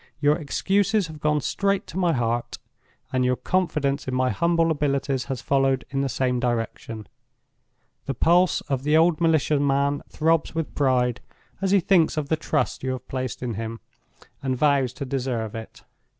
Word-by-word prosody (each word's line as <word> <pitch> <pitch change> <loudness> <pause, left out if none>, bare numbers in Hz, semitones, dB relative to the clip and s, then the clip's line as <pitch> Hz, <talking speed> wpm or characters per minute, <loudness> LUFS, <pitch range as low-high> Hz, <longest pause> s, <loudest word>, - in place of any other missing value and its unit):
Your 145 0 +4
excuses 195 +6 +1
have 155 -2 -9
gone 150 0 +1
straight 200 +6 0
to 175 - -8
my 175 -2 +3
heart; 120 -3 -1 0.6
and 130 0 +2
your 125 0 +2
confidence 150 -5 -1
in 130 - -2
my 130 0 +2
humble 165 +7 +2
abilities 140 -3 0
has 135 -3 -5
followed 135 -2 +1
in 135 0 0
the 140 - -1
same 125 0 0
direction. 115 -2 -3 1.0
The 135 - -2
pulse 175 +7 +3
of 135 -2 -2
the 150 +3 +3
old 165 0 +3
militia 155 -3 +3
man 140 0 +1
throbs 160 0 +1
with 165 -1 -3
pride 125 -3 +1 0.4
as 195 - +1
he 200 +1 +5
thinks 170 -3 +3
of 145 -2 -2
the 160 - +3
trust 155 -1 -1
you 130 0 -2
have 130 - -8
placed 130 -1 -4
in 120 -2 -2
him, 115 +2 -5 0.6
and 130 -2 -1
vows 140 -3 +2
to 140 - -5
deserve 125 -5 -2
it. 110 0 -9
140 Hz, 175 wpm, -24 LUFS, 130-160 Hz, 1.0 s, he